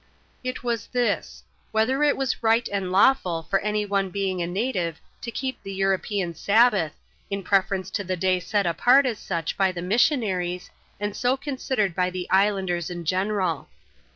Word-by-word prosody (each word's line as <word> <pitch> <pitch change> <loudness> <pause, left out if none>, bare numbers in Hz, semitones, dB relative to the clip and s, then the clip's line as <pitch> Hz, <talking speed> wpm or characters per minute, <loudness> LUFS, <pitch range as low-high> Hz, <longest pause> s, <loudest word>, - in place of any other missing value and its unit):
It 255 0 -4
was 235 -3 -2
this: 245 -1 -1
— - - -38
whether 240 +6 +2
it 295 -1 +3
was 270 -2 -1
right 230 +1 +3
and 195 -2 -2
lawful 185 -5 +3
for 195 +5 +1
any 210 0 -1
one 200 -1 0
being 190 -1 -2
a 170 - -1
native 180 -4 -2 0.2
to 235 - -5
keep 260 +2 -4
the 195 - -7
European 195 -1 0
Sabbath, 205 -4 +3 0.4
in 200 0 -3
preference 195 -1 +1
to 205 - -2
the 185 -1 -2
day 185 +1 +2
set 200 +3 0
apart 245 +11 +4
as 235 -5 -1
such 165 -3 -3
by 195 -1 +2
the 175 -1 -6
missionaries, 185 - +1 0.3
and 205 0 -3
so 250 +3 +1
considered 260 - -2
bjr 180 0 +1
the 180 -1 -4
islanders 190 -3 +2
in 175 -1 -6
general. 185 -3 -1
195 Hz, 175 wpm, -25 LUFS, 180-230 Hz, 0.4 s, apart